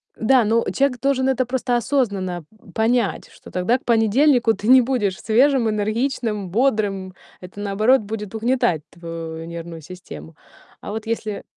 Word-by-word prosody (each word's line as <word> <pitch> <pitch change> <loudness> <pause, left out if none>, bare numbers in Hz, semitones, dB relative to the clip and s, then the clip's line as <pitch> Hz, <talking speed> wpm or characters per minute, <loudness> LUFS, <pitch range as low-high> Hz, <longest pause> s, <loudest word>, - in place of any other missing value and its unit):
Да, 245 +2 +3
ну 230 +2 +2
человек 275 -2 +1
должен 265 -1 +1
это 255 -1 +1
просто 250 -1 -1
осознанно 200 - -1 0.3
понять, 225 -1 0
что - - -15
тогда 185 +8 +1
к - - -27
понедельнику 235 +2 +3
ты 205 +3 -6
не 260 0 +8
будешь 230 -7 -1
свежим, 245 +1 +3
энергичным, 215 -1 -2
бодрым. 205 -5 0 0.3
Это, 185 +2 -11
наоборот, 215 +5 +2
будет 210 0 -6
угнетать 235 - +1
твою 165 -1 -7
нервную 170 -1 -8
систему. 170 -1 -11 0.5
А - - -7
вот 220 +1 -5
если 220 -2 -3
220 Hz, 145 wpm, -21 LUFS, 190-250 Hz, 0.5 s, не